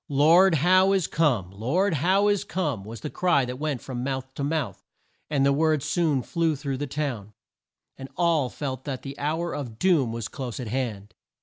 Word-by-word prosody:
"Lord 165 +6 +5
Howe 185 +5 +4
is 190 -4 +2
come! 125 - +1
Lord 150 - 0
Howe 185 +7 +2
is 205 -1 +1
come!" 155 - -2
was 115 +3 -9
the 150 - -5
cry 175 -8 +2
that 125 +1 -6
went 150 -4 -2
from 125 -2 -5
mouth 130 0 -4
to 140 - -4
mouth, 145 - -2 0.5
and 140 -3 +2
the 140 - +4
word 155 -1 +2
soon 150 -4 +1
flew 165 +3 0
through 140 -1 -4
the 145 +2 -3
town, 125 -8 -4 0.7
and 135 0 -8
all 165 -6 +2
felt 130 -2 -5
that 135 -3 -4
the 140 0 -8
hour 160 +4 -1
of 120 -6 -6
doom 155 -7 +2
was 115 -1 -4
close 125 0 -6
at 120 -4 -5
hand. 110 -5 -3
140 Hz, 195 wpm, -25 LUFS, 125-165 Hz, 0.7 s, Lord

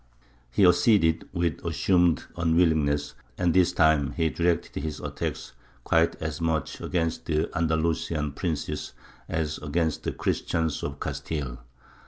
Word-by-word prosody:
He 95 +11 +3
acceded, 90 -2 +4
with 85 -4 -1
assumed 90 -3 +2
unwillingness, 80 -4 +2 0.2
and 90 -2 +2
this 90 -2 +4
time 80 -4 +3
he 80 -2 0
directed 85 -1 0
his 80 -2 -4
attacks - - -4 0.3
quite 80 0 +3
as 80 0 -5
much 80 -1 -1
against 80 -2 -1
the 80 -1 0
Andalusian 80 -2 0
princes 80 +1 -3 0.4
as 80 -2 -2
against 80 +1 -1
the - - -2
Christians 80 -2 -1
of 70 0 -5
Castile. 70 -2 -4
80 Hz, 125 wpm, -26 LUFS, 75-85 Hz, 0.4 s, acceded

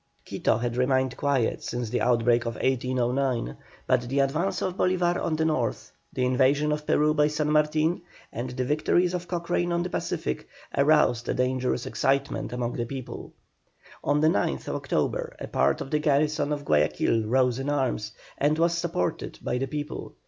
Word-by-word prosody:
Quito - - 0
had 120 +1 -2
remained 130 0 +1
quiet 140 -5 0
since 120 -2 -4
the 125 - 0
outbreak 120 0 +3
of 115 - -3
1809, 125 - 0 0.3
but 130 -1 +3
the 135 - -1
advance 165 +8 +1
of 185 -1 -2
Bolívar 180 -2 +1
on 160 - 0
the 160 0 0
north, 130 -8 -1 0.2
the 125 - 0
invasion 135 +4 +3
of 150 0 -3
Peru 150 +1 +3
by 150 -1 +3
San 150 0 -1
Martin, 155 +3 +2 0.3
and 120 +2 -4
the 125 +1 -3
victories 155 +5 +2
of 180 0 -3
Cochrane 175 0 -1
on 170 0 +1
the 180 - -5
Pacific, 65 0 -3 0.3
aroused 140 -5 +3
a - - 0
dangerous 125 -1 0
excitement 140 +1 0
among 120 -1 -2
the 120 - -2
people. 130 -2 -7 0.7
On 145 +1 +2
the 155 - +4
9th 170 - 0
October - - -1
a - - -6
part - - +1
of 135 - -6
the 150 - +2
garrison 150 0 +1
of 145 -1 -3
Guayaquil 105 - +2
rose 125 +1 +2
in 135 +2 -2
arms, 130 -7 -1 0.3
and 150 +2 +2
was 170 +1 +2
supported 170 - -2
by 125 - -1
the 135 - -1
people. 145 +2 -5
140 Hz, 175 wpm, -26 LUFS, 125-155 Hz, 0.7 s, the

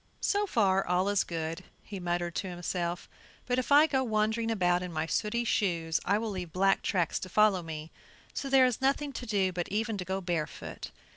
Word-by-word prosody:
"So 410 0 +1
far 195 - +2
all 180 +2 +1
is 205 -1 +2
good," 165 +1 -4 0.2
he 200 -2 -7
muttered 175 -1 -2
to 190 - -3
himself, 175 0 -3 0.4
"but 250 0 +1
if 255 - -4
I 295 +2 +8
go 265 -4 +1
wandering 220 0 0
about 180 -5 +2
in 180 -1 -5
my 155 -1 -1
sooty 210 +8 -1
shoes 170 -8 0
I 200 +2 +2
will 220 0 -3
leave 180 -4 -5
black 195 +2 +2
tracks 175 -4 0
to 185 - -7
follow 210 -1 +4
me, 160 -1 -7 0.4
so 275 - -4
there 265 -1 +6
is 250 0 0
nothing 280 +1 +1
to 245 - -6
do 195 -3 +1
but 175 -1 -4
e'en 220 0 -1
to - - -2
go 190 +2 -2
barefoot." 170 -5 -4
195 Hz, 205 wpm, -30 LUFS, 175-225 Hz, 0.4 s, I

